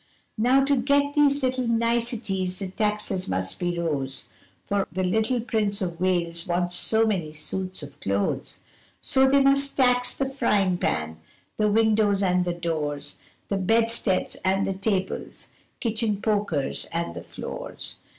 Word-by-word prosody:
Now 255 +4 +4
to 280 +1 +3
get 285 +3 +2
these 290 -2 +3
little 255 -1 0
nicities 230 -5 0
the 195 -1 -4
taxes 210 -2 -1
must 95 +1 -1
be 175 -1 -1
rose, 140 -6 -2 0.3
For 200 -1 0
the 185 +2 -2
little 220 +6 +1
Prince 215 -3 0
of 175 -3 -4
Wales 170 -2 0
wants 175 0 0
so 220 +5 +3
many 175 -8 -1
suits 185 +3 -2
of 145 -1 -11
clothes, 100 +1 -2 0.4
So 265 0 +3
they 280 +1 +5
must 275 +1 +3
tax 250 -1 +3
the 270 - 0
frying 205 -9 +1
pan, 80 0 -1 0.4
the 215 -1 +2
windows 210 -2 +3
and 180 -1 +2
the 175 - -1
doors, 150 -4 -3 0.3
The 200 - 0
bedsteads 225 0 +1
and 190 +1 +2
the 195 - -1
tables, 190 -1 -3 0.3
kitchen 220 -3 0
pokers 205 -11 0
and 170 +1 -2
the - - -7
floors. - - -6
200 Hz, 150 wpm, -25 LUFS, 175-235 Hz, 0.4 s, they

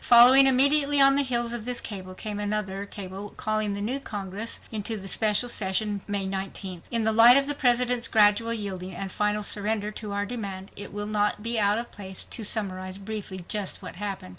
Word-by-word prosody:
Following 250 +3 +7
immediately 280 +2 +6
on 275 0 +6
the 285 - +3
heels 240 -3 0
of 240 -2 -2
this 250 +1 -2
cable 185 -3 -8
came 210 +1 -6
another 205 -1 -3
cable 200 +1 -9
calling 215 -1 -1
the 200 - -5
new 250 +7 -3
Congress 205 -2 -6
into 210 -2 -2
special 215 +4 +1
session 205 -1 0
May 200 -1 -1
19th. 190 -2 -5
In 230 -2 +1
the 220 - +3
light 230 +3 +8
of 275 - +3
the 290 - -1
President's 245 -2 +1
gradual 215 +1 +3
yielding 190 -5 -5
and 195 -1 -5
final 210 +1 -1
surrender 210 +1 -2
to 210 -1 -8
our 200 0 -2
demand, 200 -4 -7
it 205 - -8
will 205 0 -4
not 210 0 -1
be 230 0 +1
out 205 0 +2
of 235 +1 -6
place 190 -2 -6
to 225 - -5
summarize 185 -3 -2
briefly 200 -3 -7
just 205 -2 -2
what 180 -1 -9
happened. 200 - -6
210 Hz, 195 wpm, -25 LUFS, 195-235 Hz, -, light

